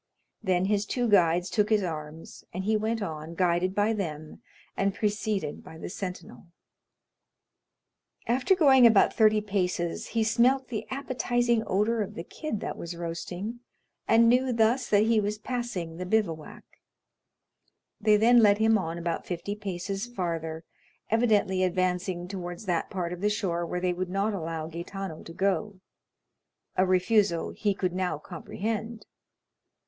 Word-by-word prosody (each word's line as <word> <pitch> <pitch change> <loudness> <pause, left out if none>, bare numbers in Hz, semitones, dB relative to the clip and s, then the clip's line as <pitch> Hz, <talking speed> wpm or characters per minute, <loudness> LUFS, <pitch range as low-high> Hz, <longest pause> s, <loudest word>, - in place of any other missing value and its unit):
Then 185 -3 +1
his 205 +1 0
two 245 -2 0
guides 175 -4 +4
took 210 +3 +2
his 215 -2 +3
arms, 155 -2 -7
and 185 - -4
he 215 +3 +1
went 220 +1 -1
on, 160 -2 -6
guided 180 +1 +1
by 210 +2 +2
them, 155 -7 -5 0.3
and 195 0 0
preceded 210 -5 -2
by 160 - -11
the 165 - -7
sentinel. 180 -2 -7 1.8
After 255 +10 +2
going 270 -8 +7
about 220 -4 +4
thirty 215 -1 +4
paces, 180 -4 -2
he 225 -1 0
smelt 250 +4 +2
the 220 -4 -4
appetizing 245 -3 0
odor 215 +4 +1
of 205 - -4
the 165 - -5
kid 300 - -5
that - - -4
was 170 0 -6
roasting, 175 +6 -5 0.5
and 230 +1 +5
knew 250 +2 +3
thus 230 +2 +2
that 205 0 +5
he 225 0 +3
was 210 0 -1
passing 210 -8 -4
the 180 - -4
bivouac; 180 -7 -1 1.4
they 210 0 +4
then 240 +3 +6
led 205 -2 +5
him 220 0 +4
on 165 -2 -4
about 170 -1 -3
fifty 180 +3 -3
paces 195 +1 -4
farther, 165 -7 -4 0.5
evidently 215 -5 +2
advancing 180 -1 0
towards 180 +1 -6
that 175 -3 -1
part 180 -2 -3
of 180 - -8
the 210 - +2
shore 175 -5 -1
where 180 - -2
they 180 0 0
would 180 0 -3
not 200 +3 0
allow 165 -4 -4
Gaetano 170 +1 -6
to 165 - -10
go—a 190 0 -4
refusal 185 -1 +2
he 205 -2 -1
could 185 -2 -1
now 180 -4 -1
comprehend. 215 +7 -5
195 Hz, 150 wpm, -28 LUFS, 175-220 Hz, 1.8 s, going